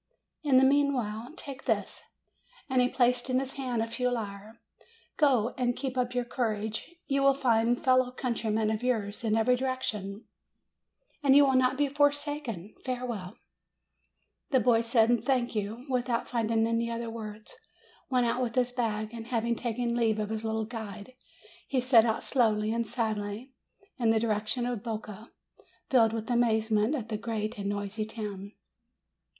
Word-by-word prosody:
In 280 -4 +4
the 260 - +6
meanwhile, 265 -4 +1
take 270 -2 -8
this." - - -1 0.7
And 260 -2 +2
he 250 - +3
placed 245 0 +1
in 255 - +2
his 270 0 -3
hand 250 -4 -2
a - - -3
few 250 +2 -1
lire. 215 -1 -5 0.6
"Go, 255 -7 +3
and 245 -1 +1
keep 265 -1 -3
up 250 -1 -1
your 245 -1 0
courage; 220 +4 -3
you 275 -1 0
will 275 0 +5
find 240 -2 +2
fellow 255 -1 +3
countrymen 225 -4 -1
of 215 - -2
yours 220 -4 -1
in 220 -1 +1
every 225 +3 +3
direction, 230 -6 -3 1.0
and 275 -2 +5
you 285 0 +8
will 270 - +2
not 255 0 +3
be 290 0 +2
forsaken. 290 - -1
Farewell 240 -7 -4 0.5
!" - - -43
266 - - +1
MAY - - +8
The 245 - +1
boy 230 -2 +5
said, 230 0 +3
"Thank 250 -4 +1
you," 215 +4 -3
without 245 -2 -1
finding 225 -1 +1
any 230 0 0
other 230 0 -4
words, 215 -1 -7 0.5
went 250 -2 +2
out 235 +2 0
with 235 -2 -2
his 250 -1 +2
bag, 220 -3 -2
and 230 -1 -7
having 235 -1 0
taken 235 0 -2
leave 225 -2 +2
of 210 0 -2
his 220 0 -3
little 220 0 -1
guide, 220 0 -8 0.5
he 265 - +1
set 245 -3 +5
out 225 -1 0
slowly 220 -4 +2
and 230 -1 -1
sadly 220 +1 -3 0.5
in 235 -2 +2
the 225 0 +4
direction 220 +2 0
of 245 -4 -2
Boca, 215 -1 -6 0.6
filled 230 -4 +5
with 225 +2 -3
amazement 220 +1 +2
at 230 -5 -5
the 215 - -2
great 215 -1 -3
and 200 0 -2
noisy 205 +1 -3
town. 210 -2 -6
235 Hz, 170 wpm, -29 LUFS, 220-255 Hz, 1.0 s, you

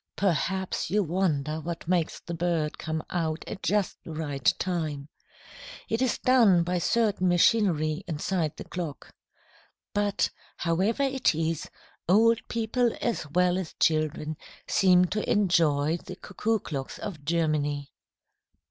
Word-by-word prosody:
Perhaps 190 0 0
you 205 +3 +2
wonder 155 -4 0
what 165 +1 -6
makes 175 -2 0
the 170 - -6
bird 165 -3 -1
come 160 0 -3
out 160 -2 -1
at 195 - -7
just 205 -2 0
the - - -11
right 145 -4 0
time. 155 -6 -3 0.8
It 225 +3 0
is 260 -2 +1
done 225 -9 +5
by 180 +1 -1
certain 205 -1 +1
machinery 175 -3 +3
inside 165 0 -2
the - - -6
clock. 170 -6 -6 0.8
But, 205 -1 +1 0.3
however 190 +10 +1
it 265 - +1
is, 160 0 -2 0.4
old 225 +4 +5
people 230 +1 0
as 225 -10 -2
well 180 +3 +2
as 180 -4 -6
children 155 -1 +1 0.3
seem 180 -3 +5
to 210 +4 -2
enjoy 165 -7 +3
the 185 - -9
cuckoo 220 +4 -1
clocks 140 -9 -5
of 165 -8 -7
Germany. 150 -3 0
175 Hz, 130 wpm, -27 LUFS, 155-200 Hz, 0.8 s, done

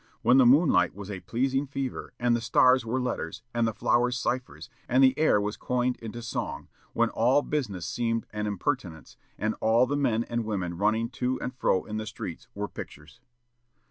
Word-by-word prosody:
when 125 +2 +5
the 125 - +6
moonlight 130 - +4
was 100 0 -7
a 95 - -5
pleasing 135 +7 -1
fever, 135 -1 -4
and 120 -1 +2
the 120 - -2
stars 125 +3 +4
were 115 +3 -1
letters, 125 -2 -4
and 120 -1 +1
the - - 0
flowers 120 +3 +1
ciphers, 125 +1 -3 0.2
and 130 +2 +4
the 130 0 +5
air 155 -9 +3
was 105 +1 -2
coined 125 0 0
into 115 +1 -7
song; 75 -9 -4 0.2
when - - +2
all 130 +5 +3
business 105 - -3
seemed 115 +3 -1
an 105 0 -2
impertinence, 100 - -3 0.2
and 110 +1 -1
all 115 +3 +4
the 140 +3 -2
men 120 -6 +1
and 120 0 -3
women 95 -5 -3
running 110 +5 +1
to 125 +1 -2
and 125 - -4
fro 95 -7 +1
in 110 0 -5
the 110 0 -4
streets 95 -5 -7
were - - -3
pictures." 75 +1 -10
120 Hz, 190 wpm, -27 LUFS, 105-130 Hz, 0.2 s, the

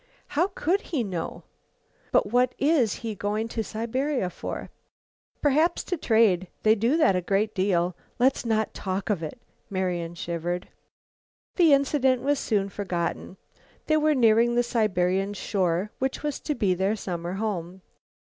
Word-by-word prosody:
"How 335 +6 +2
could 370 +6 +1
he 300 - -2
know?" 180 -6 -5 0.7
"But - - +4
what 250 +1 +2
is 280 -7 +3
he 225 - -2
going 210 +2 -2
to 225 -1 -2
Siberia 235 0 -2
for?" - - -6 0.7
"Perhaps 305 +4 +3
to 360 - -2
trade. 220 - +3 0.2
They 215 - +6
do 230 +8 +2
that 200 - +4
a 180 - +1
great 200 +4 0
deal. 180 -3 +1 0.2
Let's 260 +2 +2
not 220 -2 0
talk 190 +2 -3
of 190 -5 -1
it." 155 +7 -6 0.3
Marian 180 -3 -2
shivered. 170 +1 -3 0.9
The 335 -5 +5
incident 270 -2 +2
was 285 0 +1
soon 200 -3 0
forgotten. 185 -1 -3 0.5
They 310 - +3
were 305 0 +3
nearing 235 -1 +4
the 240 - +3
Siberian 195 -4 0
shore 185 0 -1
which 265 +2 -2
was 295 -2 -2
to 300 - -3
be 200 -6 +2
their 190 +4 0
summer 175 -4 -4
home. 190 -3 -4
215 Hz, 150 wpm, -26 LUFS, 185-255 Hz, 0.9 s, They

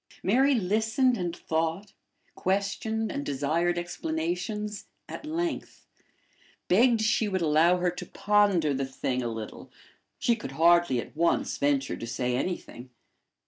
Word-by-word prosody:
Mary 265 +8 +4
listened 225 +5 +2
and 175 -4 -3
thought, 165 +5 -2 0.4
questioned, 205 +3 -1
and 140 - -3
desired 155 +5 0
explanations 175 +5 -3 0.2
at 305 - -8
length, 335 +2 -3 0.8
begged 230 +4 +4
she 220 0 +2
would 190 -3 -1
allow 160 +3 +4
her 180 0 +1
to 180 - -8
ponder 200 -7 +2
the 135 0 -1
thing 130 -1 -2
a 120 - -2
little: 110 -2 -7 0.5
she 235 - +2
could - - -8
hardly 170 -5 +4
at - - -8
once 170 +2 +1
venture 140 -1 +1
to 115 - -7
say 125 +1 -1
anything. 130 -4 -4
175 Hz, 135 wpm, -27 LUFS, 150-210 Hz, 0.8 s, Mary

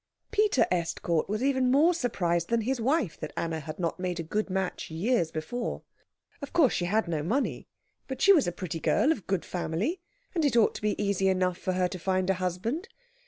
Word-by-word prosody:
Peter 425 -9 +3
Estcourt 170 -1 0
was 215 +4 -1
even 260 -2 +2
more 300 +7 +5
surprised 175 - 0
than 235 -1 +2
his 250 +2 -1
wife 260 - 0
that - - -5
Anna 165 -1 -1
had 155 +1 -7
not 170 0 -2
made 180 -1 -2
a - - -2
good 210 +6 -2
match 190 -1 -2
years 170 +2 +1
before. 235 +11 -4 0.6
Of 280 - -7
course 315 -8 +4
she 175 - 0
had 210 +3 +1
no 160 -3 -1
money, 225 - -1 0.4
but 265 - -5
she 400 - +7
was 310 - +3
a - - +1
pretty 175 -2 -5
girl 290 - +3
of 240 - -3
good 190 -3 -1
family, 190 - -2 0.3
and 335 -4 0
it 275 -5 +2
ought 225 - +4
to - - -7
be 210 0 -1
easy 200 -2 +1
enough 185 -1 +1
for 185 - -1
her 180 0 +2
to 185 0 -7
find 185 +1 +1
a 185 -1 -3
husband. 220 - -2
195 Hz, 210 wpm, -28 LUFS, 175-255 Hz, 0.6 s, she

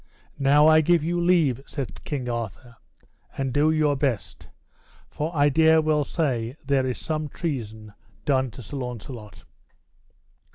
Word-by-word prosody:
Now 145 +2 +5
I 155 0 +6
give 170 0 +3
you 175 +2 -1
leave, 165 -8 +2
said 130 -10 -6
King 135 -4 -3
Arthur, 120 0 -5 0.6
and 135 -2 -2
do 150 +3 +3
your 155 -2 +2
best, 135 -6 -3 0.6
for 155 +2 -4
I 145 0 +4
dare 160 +2 +5
well 155 -1 +2
say 130 -6 -2
there 135 -2 +1
is 125 - -2
some 155 -1 -3
treason 110 -11 -5 0.3
done 130 -2 +1
to 120 +3 -11
Sir 140 - -7
Launcelot. 120 -3 -7
140 Hz, 140 wpm, -24 LUFS, 125-155 Hz, 0.6 s, I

